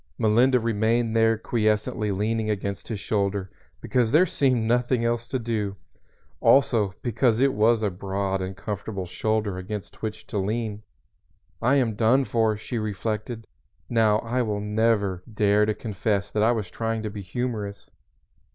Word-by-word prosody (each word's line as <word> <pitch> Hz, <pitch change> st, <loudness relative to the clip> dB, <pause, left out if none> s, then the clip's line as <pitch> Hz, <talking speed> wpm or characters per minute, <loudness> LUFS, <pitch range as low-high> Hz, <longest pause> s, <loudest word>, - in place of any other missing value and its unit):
Melinda 120 Hz, +4 st, +4 dB
remained 115 Hz, +1 st, +1 dB
there 115 Hz, 0 st, +4 dB
quiescently 105 Hz, -1 st, 0 dB
leaning 110 Hz, +3 st, -1 dB
against 100 Hz, -1 st, -3 dB
his 110 Hz, -4 st, -4 dB
shoulder, 100 Hz, -2 st, -1 dB, 0.3 s
because 120 Hz, -3 st, +1 dB
there 160 Hz, +6 st, +6 dB
seemed 130 Hz, -8 st, +1 dB
nothing 120 Hz, +1 st, +1 dB
else 115 Hz, 0 st, -1 dB
to 130 Hz, -, -1 dB
do, 110 Hz, -4 st, -2 dB, 0.6 s
also 115 Hz, -8 st, +3 dB
because 120 Hz, -1 st, +2 dB
it 135 Hz, 0 st, +3 dB
was 110 Hz, +1 st, +3 dB
a 105 Hz, -, +1 dB
broad 95 Hz, +1 st, -2 dB
and 95 Hz, 0 st, -5 dB
comfortable 100 Hz, -2 st, -4 dB
shoulder 105 Hz, +1 st, -1 dB
against 100 Hz, +2 st, -7 dB
which 110 Hz, -1 st, -5 dB
to 105 Hz, -, -3 dB
lean. 105 Hz, +1 st, -2 dB, 0.8 s
"I 130 Hz, +4 st, +3 dB
am 125 Hz, -5 st, +2 dB
done 120 Hz, +5 st, +3 dB
for," 110 Hz, -3 st, +1 dB
she 115 Hz, +3 st, -4 dB
reflected. 110 Hz, +2 st, -3 dB, 0.5 s
"Now 110 Hz, -3 st, +4 dB
I 120 Hz, +2 st, -1 dB
will 105 Hz, -3 st, -1 dB
never 105 Hz, -3 st, +1 dB
dare 105 Hz, 0 st, +3 dB
to 110 Hz, -, 0 dB
confess 105 Hz, -2 st, -2 dB
that 105 Hz, -, 0 dB
I 110 Hz, +2 st, +4 dB
was 105 Hz, -7 st, -2 dB
trying 115 Hz, +1 st, -2 dB
to 105 Hz, -, -3 dB
be 100 Hz, -1 st, -6 dB
humorous." 105 Hz, 0 st, -4 dB
110 Hz, 155 wpm, -25 LUFS, 105-115 Hz, 0.8 s, there